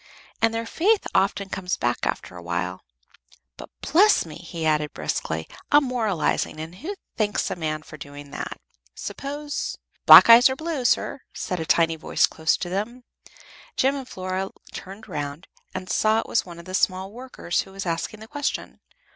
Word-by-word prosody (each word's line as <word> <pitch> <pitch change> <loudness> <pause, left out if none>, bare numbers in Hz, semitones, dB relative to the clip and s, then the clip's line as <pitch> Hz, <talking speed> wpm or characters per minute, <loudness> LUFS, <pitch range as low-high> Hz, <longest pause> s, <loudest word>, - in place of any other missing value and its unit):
and 225 0 +4
their 230 0 -2
faith 390 - +2
often 195 0 +2
comes 185 -1 -2
back 120 0 0
after - - -4
a 90 - -8
while. 85 +2 -3 0.7
But, - - -10
bless 405 - +4
me!" 155 -2 -9
he 170 -2 -6
added, 150 -1 +1
briskly, 80 +1 -2 0.2
"I'm 295 0 +7
moralizing, 220 - 0
and 160 +2 -6
who 325 - -6 0.2
thanks 210 -2 0
a - - -1
man 155 -2 -3
for 155 - -11
doing 145 0 -10
that? - - -5 0.4
Suppose 290 +1 -4
" - - -42
"Black - - +12
eyes 235 +3 +9
or 260 - -1
blue, 315 -3 -3
sir?" 265 - +1
said 180 - -3
a 160 - -4
tiny 165 -1 +3
voice 160 - +2
close 160 0 0
to 180 - -4
them. 215 +7 -3 0.7
Jem 270 +2 +3
and 270 -2 -6
Flora 185 +1 -3 0.2
turned 195 +4 -9
round, 145 +3 -5 0.2
and 185 - -6
saw 215 +3 +3
it - - -3
was 230 - 0
one 170 -1 -9
of 170 - -11
the 185 - -8
small 190 +1 +1
workers 245 -7 -3
who 195 - -12
was 195 0 -6
asking 170 +5 -3
the 220 - -10
question. 290 +2 -3
190 Hz, 180 wpm, -24 LUFS, 160-245 Hz, 0.7 s, Black